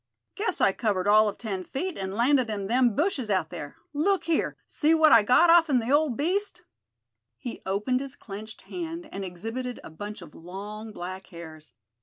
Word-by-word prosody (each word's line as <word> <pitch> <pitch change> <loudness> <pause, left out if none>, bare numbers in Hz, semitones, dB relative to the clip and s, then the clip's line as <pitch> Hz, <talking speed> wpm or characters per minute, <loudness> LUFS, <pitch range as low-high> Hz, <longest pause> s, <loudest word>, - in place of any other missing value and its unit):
Guess 400 -3 -2
I - - +5
covered 200 -3 -1
all 215 +1 +6
of 200 - -7
ten 195 -5 -4
feet, 345 - -4
and 190 0 -4
landed 250 +1 +3
in 205 -2 -3
them 240 +1 +3
bushes 295 - 0
out 190 -2 0
there. - - -7 0.2
Look 375 +7 +1
here! 330 -1 0
See 315 +2 +2
what 315 -1 +6
I 230 - +9
got 255 +11 +5
off'n 330 -6 +5
the 240 +1 -1
old 290 -4 +3
beast." 375 +8 -1 0.7
He 240 -3 -7
opened 210 +7 0
his 275 0 -6
clenched 215 -1 -9
hand, 335 -1 -6
and 195 - -5
exhibited 225 +8 -5
a - - -10
bunch 205 +4 -7
of 150 - -14
long 205 +5 -8
black 185 0 -7
hairs. 160 -3 -11
225 Hz, 185 wpm, -27 LUFS, 195-295 Hz, 0.7 s, I